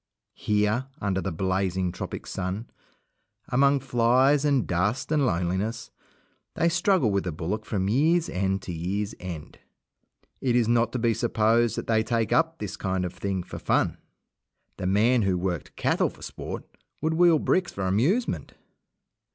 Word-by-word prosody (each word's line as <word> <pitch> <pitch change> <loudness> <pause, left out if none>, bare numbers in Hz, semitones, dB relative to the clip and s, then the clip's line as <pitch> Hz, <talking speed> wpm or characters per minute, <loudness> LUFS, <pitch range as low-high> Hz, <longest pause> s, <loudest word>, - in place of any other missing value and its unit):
Here, 105 +4 0
under 95 -2 -1
the - - -3
blazing 95 +1 0
tropic - - -6
sun, 95 +4 -4 0.8
among 140 +2 +3
flies 130 +3 +3
and 140 -5 +2
dust 105 - -1
and 145 -4 +3
loneliness, 95 +5 -2 0.6
they 170 - +2
struggle 175 - +2
with 100 -1 +1
the 90 - -3
bullock 90 +8 -4
from 95 -3 -1
year's 155 +10 +3
end 95 +1 -1
to 90 - -5
year's 100 +6 -2
end. 85 -4 -8 0.8
It 125 -3 +1
is 120 -2 +3
not 115 -1 +2
to - - 0
be 115 -1 +2
supposed 115 0 +2
that - - -4
they 110 -1 +2
take 115 0 0
up 165 0 +2
this 105 -5 -5
kind 95 -1 -1
of 90 - -5
thing 95 -2 -3
for - - -8
fun. - - +1 0.8
The 90 - -3
man 115 +6 +3
who 95 -3 +1
worked 90 -2 -3
cattle - - +1
for - - -15
sport - - -6 0.4
would 160 +2 +1
wheel 170 0 +5
bricks 185 +4 +1
for 95 - -4
amusement. 140 - 0
110 Hz, 160 wpm, -26 LUFS, 95-130 Hz, 0.8 s, wheel